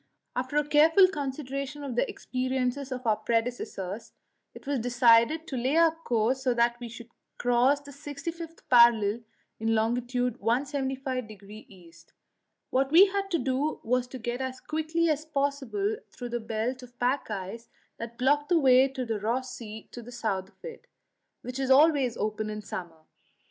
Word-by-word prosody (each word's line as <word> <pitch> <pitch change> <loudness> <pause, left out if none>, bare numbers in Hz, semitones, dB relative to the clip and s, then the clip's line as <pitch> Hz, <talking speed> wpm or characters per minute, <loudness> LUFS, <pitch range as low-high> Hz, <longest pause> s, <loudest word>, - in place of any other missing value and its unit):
After 260 +3 -2
a 295 0 +2
careful 320 +6 +6
consideration 275 -2 -4
of 265 -4 -5
the - - +1
experiences 255 +1 -2
of 255 0 -5
our 215 -2 +3
predecessors, 225 -4 -3 0.4
it - - -12
was 280 -1 -1
decided 240 +5 +4
to 275 - -6
lay 260 +4 0
our 330 -1 +6
course 255 -5 0
so 255 -2 +1
that 235 0 +2
we 240 -1 -7
should 235 0 -11 0.3
cross 245 +4 +3
the 285 0 -12
65th 310 +4 -7
parallel 235 -3 +5 0.4
in 225 0 +1
long. 220 +2 +2
175° 250 -2 -2 0.2
E. 175 -4 -16 0.8
What 270 +1 +1
we 350 +5 +9
had 395 0 -2
to 345 - +1
do 270 +3 -1
was 250 +2 0
to 260 - -8
get 240 +1 -4
as 260 0 -4
quickly 315 +2 -1
as 305 -1 0
possible 290 - -1
through 245 -1 -8
the 240 0 -2
belt 225 +3 -3
of 245 -1 -14
pack 250 +2 0
ice 210 +3 -6 0.3
that 230 0 -7
blocked 290 +3 +2
the 350 - +4
way 260 -3 +6
to 265 -2 -5
Ross 250 +4 -2
Sea 220 -2 -9
to 240 - -8
the 240 +1 -11
south 200 -6 -3
of - - -17
it, 475 -1 -9 0.6
which 250 +2 -6
is 265 -1 -1
always 275 -3 +4
open 215 0 -2
in 210 0 -5
summer. 170 -5 -7
255 Hz, 165 wpm, -28 LUFS, 235-285 Hz, 0.8 s, we